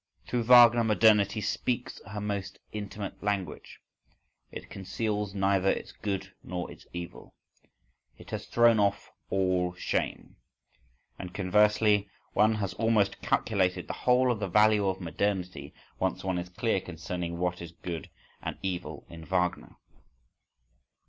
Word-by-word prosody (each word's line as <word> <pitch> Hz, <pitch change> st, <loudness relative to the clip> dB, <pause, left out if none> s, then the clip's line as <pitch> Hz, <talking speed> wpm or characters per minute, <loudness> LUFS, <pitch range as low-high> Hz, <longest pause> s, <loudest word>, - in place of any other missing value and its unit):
Through 120 Hz, -2 st, -1 dB
Wagner 120 Hz, -1 st, +8 dB
modernity 110 Hz, -1 st, +4 dB
speaks 125 Hz, +4 st, -2 dB
her 100 Hz, +2 st, -5 dB
most 100 Hz, -2 st, -3 dB
intimate 105 Hz, -1 st, -6 dB
language: 100 Hz, -6 st, -3 dB, 0.7 s
it -, -, -8 dB
conceals 105 Hz, +1 st, -3 dB
neither 95 Hz, -1 st, +2 dB
its -, -, -2 dB
good 100 Hz, -2 st, -4 dB
nor 90 Hz, -1 st, -5 dB
its -, -, -14 dB
evil: 85 Hz, -1 st, -8 dB, 0.8 s
it -, -, -13 dB
has -, -, -4 dB
thrown 120 Hz, -2 st, +5 dB
off 100 Hz, 0 st, 0 dB, 0.2 s
all 90 Hz, -2 st, +1 dB
shame. -, -, -3 dB, 0.8 s
And, 90 Hz, -1 st, -7 dB
conversely, 105 Hz, +1 st, +3 dB, 0.2 s
one 110 Hz, +1 st, +4 dB
has 100 Hz, -3 st, -2 dB
almost 110 Hz, -3 st, +1 dB
calculated 95 Hz, -4 st, +1 dB
the -, -, -5 dB, 0.2 s
whole 125 Hz, 0 st, +5 dB
of 115 Hz, -, -2 dB
the 100 Hz, -, -2 dB
value 105 Hz, +1 st, +4 dB
of 95 Hz, 0 st, -1 dB
modernity 90 Hz, +2 st, -2 dB, 0.3 s
once -, -, -1 dB
one 95 Hz, -2 st, -1 dB
is 90 Hz, 0 st, -6 dB
clear 110 Hz, +1 st, 0 dB
concerning 85 Hz, 0 st, -5 dB
what 90 Hz, 0 st, -1 dB
is 85 Hz, -1 st, -7 dB
good 85 Hz, -2 st, -6 dB, 0.3 s
and -, -, -4 dB
evil 90 Hz, -2 st, -4 dB
in 85 Hz, -1 st, -10 dB
Wagner. 90 Hz, -8 st, -1 dB
100 Hz, 135 wpm, -29 LUFS, 90-105 Hz, 0.8 s, Wagner